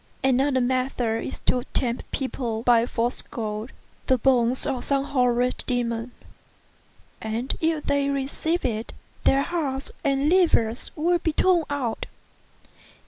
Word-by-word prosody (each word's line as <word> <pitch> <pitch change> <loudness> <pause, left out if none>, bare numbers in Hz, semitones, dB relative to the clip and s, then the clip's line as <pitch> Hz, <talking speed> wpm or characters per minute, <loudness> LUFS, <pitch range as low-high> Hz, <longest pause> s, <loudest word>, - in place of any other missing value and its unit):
Another 265 0 +3
method 245 -3 0
is - - -6
to 250 - +2
tempt 240 -2 -1
people 240 -4 -3
by 240 -1 +4
false 240 +1 0
gold, 215 0 -5 0.4
the 260 - +4
bones 250 0 +3
of 265 -4 -2
some 275 -1 +1
horrid 250 -2 +1
demon; 240 -1 -1 1.1
and 225 +4 -2
if 320 -2 +1
they 280 0 +1
receive 280 +5 -1
it, 225 -1 -2 0.3
their 275 +1 +4
hearts 280 -6 -3
and 275 +1 +2
livers 305 -10 +3
will 345 +3 +2
be 320 -2 -1
torn 350 -1 +3
out. 260 -6 -2
260 Hz, 130 wpm, -25 LUFS, 235-280 Hz, 1.1 s, by